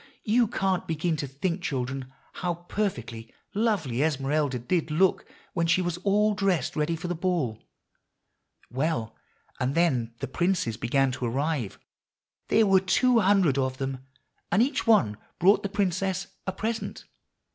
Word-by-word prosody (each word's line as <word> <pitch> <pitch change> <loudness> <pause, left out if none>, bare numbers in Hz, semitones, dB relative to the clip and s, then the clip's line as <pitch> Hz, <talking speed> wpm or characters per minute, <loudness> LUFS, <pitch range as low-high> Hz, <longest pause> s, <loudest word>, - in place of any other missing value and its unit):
you 230 +1 +3
can't 190 -4 -1
begin 165 +1 0
to 145 -2 -3
think, 170 +7 -2
children, 130 -3 -3 0.3
how 175 -1 0
perfectly 125 - -4 0.2
lovely 195 - 0
Esmeralda 145 -2 +1
did 160 +7 -1
look 175 +5 +2 0.3
when 170 -3 0
she 165 +2 +3
was 175 -2 -1
all 205 +3 +2
dressed 195 -9 0
ready 155 +2 0
for 165 +2 -5
the 175 - -1
Ball. 165 - -1 1.1
Well, 125 -4 -1 0.4
and 130 +3 0
then 125 -9 +1
the - - -4
princes 175 - 0
began 130 +4 +1
to 125 - -4
arrive. 135 -2 -1 0.7
There 220 - +4
were 195 -1 +5
two 230 +6 +3
hundred 190 -9 +3
of 130 -1 -1
them, 135 -1 -3 0.5
and 215 - +5
each 265 -1 -1
one 115 - +4 0.2
brought 195 +4 +5
the 200 - -3
princess 190 -1 0 0.2
a - - +1
present. 220 +4 -4
165 Hz, 145 wpm, -27 LUFS, 135-195 Hz, 1.1 s, were